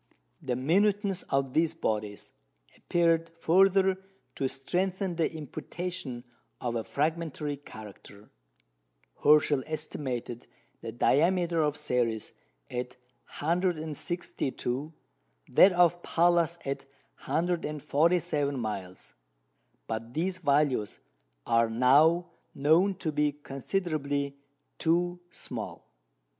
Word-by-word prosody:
The 125 -2 -2
minuteness 195 - +2
of 135 -1 0
these 165 0 +2
bodies 105 -8 -3 0.4
appeared 165 -1 +1
further 190 +2 +4 0.3
to 135 - -1
strengthen 185 +6 -2
the 165 -1 +1
imputation 155 -3 -6 0.4
of 120 -1 -2
a 115 - -1
fragmentary 150 0 -2
character. 105 -5 -12 0.9
Herschel 150 -2 +5
estimated 130 -6 -4 0.3
the 115 - -5
diameter 170 +7 +2
of 150 -1 +1
Ceres 120 -7 -1 0.4
at 125 +1 -4 0.5
162, 155 -4 -2 0.6
that 195 - +7
of 175 -1 +3
Pallas 170 0 +2
at 135 0 -3 0.4
147 155 -3 +1
miles. 95 - -5 0.7
But 115 +2 -5
these 185 +3 -1
values 140 - +1 0.5
are 115 0 +3
now 145 +9 +4 0.2
known 170 +7 +3
to 170 -4 -3
be 150 0 +1
considerably 145 -1 -2 0.4
too 175 +2 +1
small. - - -7
150 Hz, 90 wpm, -29 LUFS, 130-175 Hz, 0.9 s, that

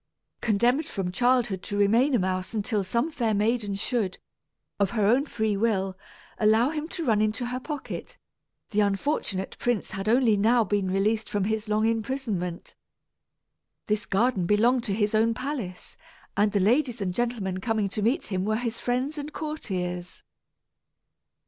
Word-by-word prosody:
Condemned 240 +7 +2
from 185 -2 -3
childhood 240 -2 +2
to 205 - -4
remain 230 +7 +4
a - - +5
mouse 185 +1 -2
until 210 -1 0
some 235 - 0
fair 230 -7 0
maiden 210 -1 0
should, 200 -2 -1 0.6
of 200 -2 +3
her 210 - +3
own 255 +8 +3
free 220 -4 0
will, 195 -3 0 0.4
allow 220 +5 +4
him 310 0 -3
to 335 -1 -4
run 215 -3 +3
into 215 +3 0
her 250 +1 -3
pocket, 290 +1 -6 0.5
the 210 - +1
unfortunate 200 -2 0
prince 240 -4 -1
had 195 +2 -3
only 235 -2 +4
now 230 +4 +4
been 200 -2 0
released 210 +3 +1
from 205 -2 0
his 215 +1 -2
long 215 +1 +2
imprisonment. 220 -6 -2 1.1
This 210 0 -1
garden 200 -3 +1
belonged 235 +5 +3
to 200 - -1
his 210 0 +1
own 225 +1 +3
palace, 245 -9 -5 0.4
and 205 +1 +3
the 200 - +1
ladies 245 +4 +2
and 185 -3 -2
gentlemen 215 -5 -1
coming 220 -1 0
to 210 - -3
meet 235 +5 0
him 185 -1 0
were 215 +2 +1
his 230 0 -3
friends 260 +5 -1
and 290 +1 -6
courtiers. 180 - -4
215 Hz, 160 wpm, -26 LUFS, 200-245 Hz, 1.1 s, a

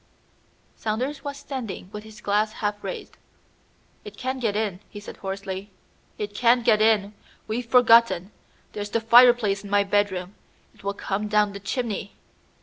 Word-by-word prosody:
Saunders 250 +7 -3
was 285 -1 -5
standing 255 -10 -6
with 210 0 -7
his 220 +1 -13
glass 210 +1 +1
half 205 -1 -3
raised. 195 - -7 0.9
"It 205 0 -11
can 260 +1 -3
get 220 -5 -1
in," 210 -4 -1
he 205 - -9
said 205 - -10
hoarsely; 195 0 -5 0.5
"it 205 -1 -4
can 240 +2 +3
get 220 -3 +4
in! 215 -2 +3 0.3
We've 230 +2 -3
forgotten. 230 -6 +5 0.4
There's 205 0 -5
the 230 - 0
fireplace 230 -3 +5
in 200 - -9
my 205 0 +3
bedroom. 195 -2 0 0.4
It - - -21
will 200 0 -2
come 205 +2 -3
down 210 -1 +2
the 200 - -7
chimney." 210 -1 -4
210 Hz, 155 wpm, -24 LUFS, 200-230 Hz, 0.9 s, forgotten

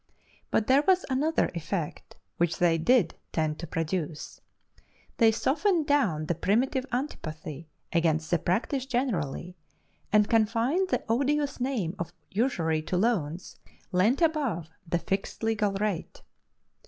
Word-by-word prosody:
But 215 - +1
there 265 +4 +5
was 375 -1 +4
another 300 +5 +1
effect 170 -1 -4 0.2
which 170 -1 +1
they 170 -2 +3
did 215 -1 +3 0.2
tend 155 -2 -1
to 170 - -5
produce 165 -1 -3 0.8
they 225 -2 +6
softened 320 - +1
down 210 - +2
the 175 - 0
primitive 255 - +1
antipathy 160 - -5 0.3
against 160 -2 +1
the 175 - +3
practice 255 - -1
generally, 180 - -2 0.6
and 210 0 +5
confined 230 - +2
the - - 0
odious 280 +5 +1
name 245 -10 -1
of 170 0 -4 0.2
usury 175 -8 +1
to 180 +3 -2
loans 180 -6 -1 0.3
lent 215 - +3
above 265 - 0 0.2
the 175 - +1
fixed 195 +5 -3
legal 215 -2 +1
rate. 195 -3 -3
205 Hz, 130 wpm, -28 LUFS, 165-260 Hz, 0.8 s, they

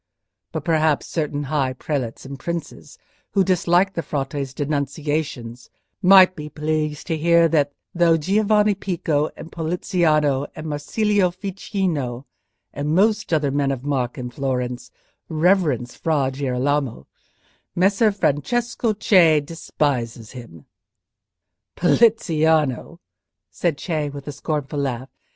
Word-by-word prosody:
But - - -5
perhaps 160 -3 +2
certain 150 -3 -2
high 135 -2 -1
prelates 130 -3 -4
and 135 0 -8
princes 170 +3 -6 0.4
who 195 - +4
dislike 185 +1 +2
the 170 - -2
Frate's 140 -2 -3
denunciations 145 -4 -3 0.3
might 185 -1 +7
be 150 -1 -7
pleased 150 0 -2
to 165 - -1
hear 170 +1 +4
that, 145 -3 +2 0.2
though 170 -2 +4
Giovanni 210 +5 +2
Pico, 165 -6 -1
and 165 - -10
Poliziano, 155 -4 +1
and 155 - -7
Marsilio 185 +6 +1
Ficino, 175 - -3 0.5
and 150 +2 -1
most 210 +1 +2
other 150 -4 +1
men 140 0 +1
of 135 -2 -3
mark 130 -4 -2
in 125 -1 -5
Florence, 125 -2 -3 0.4
reverence 155 - +1
Fra 145 -5 0
Girolamo, 135 - -1 0.7
Messer 195 +4 +3
Francesco 225 - 0
Cei 180 -7 +5
despises 135 -7 -3
him." 115 - -11 1.1
"Poliziano?" 160 - +2 0.5
said 170 -5 -1
Cei, 155 -4 -2
with 140 0 -9
a - - -3
scornful 150 0 -3
laugh. 130 -2 -3
155 Hz, 115 wpm, -22 LUFS, 140-175 Hz, 1.1 s, might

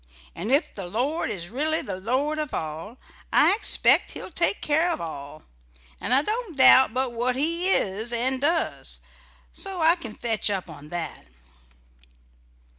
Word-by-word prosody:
And 205 +8 -3
ef 285 +5 +2
the 195 -3 -7
Lord 255 - -2
is 175 -1 -5
really 310 +6 +2
the 190 -2 -5
Lord 270 +9 -1
of 300 -3 -4
all, 160 +9 -6 0.3
I - - +5
expect 425 - +4
He'll - - -7
take 345 +4 0
care 315 +4 +1
of 345 - -2
all; 155 -2 -8 0.6
'nd - - -3
I 270 +3 +4
don't 425 - -4
doubt 260 -2 +7
but 255 +1 -1
what 245 +2 -1
He 335 +7 0
is 215 - 0
and 255 +2 -1
does. 330 +3 0 0.5
So 385 -2 -4
I 325 +1 +4
can 235 -11 -9
fetch 225 -3 0
up 190 -4 -4
on 150 -1 -12
that." 175 - -6
255 Hz, 160 wpm, -24 LUFS, 200-315 Hz, 0.6 s, doubt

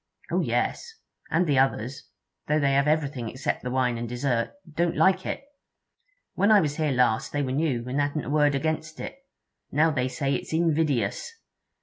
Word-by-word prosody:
'Oh - - +2
yes. 470 - -1 0.4
And 175 +3 +2
the 145 -5 +2
others, 135 +1 -1 0.4
though 150 +1 +2
they 140 -2 +2
have 140 +1 +3
everything 145 -6 0
except 130 +5 -3
the 125 - -4
wine 125 -2 0
and 120 -1 -4
dessert, 120 -1 -1 0.2
don't 170 +2 0
like 190 0 +3
it. - - -3 0.9
When 200 +3 +2
I 210 - +8
was 150 -5 -1
here 155 -2 +1
last 125 -4 +2
they 145 0 -1
were 130 - -2
new, 130 -4 0
and 135 +3 0
hadn't 145 +1 -1
a - - -5
word 150 -1 +3
against 155 +2 -2
it. - - -7 0.5
Now 160 +3 +3
they 130 -3 0
say 135 +2 -1
it's 135 - -4
invidious! 160 - +1
145 Hz, 185 wpm, -26 LUFS, 130-155 Hz, 0.9 s, I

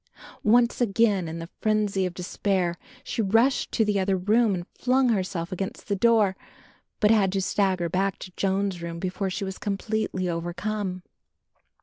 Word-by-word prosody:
Once 235 +3 +3
again 205 -5 +2
in 160 +1 -5
the 165 0 -6
frenzy 210 -3 +1
of 175 - -8
despair 180 -1 -1 0.3
she - - -2
rushed 225 +6 +2
to 220 - +2
the 205 -1 +1
other 190 0 +1
room 215 +3 +3
and 175 -1 -5
flung 255 0 +2
herself 185 -5 -1
against 190 +1 -5
the 200 - +2
door; 215 -2 +3 0.6
but 210 -1 +4
had 200 -4 +4
to 195 - 0
stagger 190 -2 +1
back 190 +3 0
to 185 - -9
Joan's 195 -2 0
room 170 0 -5
before 185 +2 -2
she 195 +2 -3
was 190 -1 -5
completely 205 -2 -2
overcome. 180 +3 -3
195 Hz, 160 wpm, -26 LUFS, 185-215 Hz, 0.6 s, but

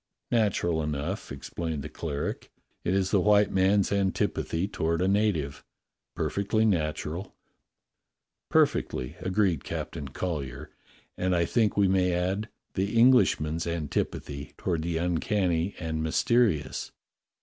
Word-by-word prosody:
"Natural 95 -8 +2
enough," 75 +6 -3
explained 70 +3 -4
the - - -5
cleric. 75 -2 -4 0.3
"It 90 - +1
is 95 -1 +1
the 100 - +4
white 105 +1 +4
man's 95 +1 +3
antipathy 95 -2 0
toward 85 -4 -1
a 90 - +2
native. 95 -9 +1 0.5
Perfectly 105 +2 0
nat 80 -8 +1
ural." 85 +6 -6 1.1
"Perfectly," 65 0 +1
agreed 95 -5 +1
Captain 70 - -5
Collyer. 75 -1 -4 0.5
"And 90 0 +1
I 85 -1 +2
think 110 +2 +1
we 100 -1 +5
may 95 -1 +2
add 95 +5 -1 0.2
the 100 +4 -1
Englishman's 85 - +4
antipathy 75 -3 -3
toward 85 -3 -1
the 85 0 -1
uncanny 90 +1 0
and 80 -2 -3
mysterious." 80 - +1
90 Hz, 120 wpm, -28 LUFS, 80-100 Hz, 1.1 s, we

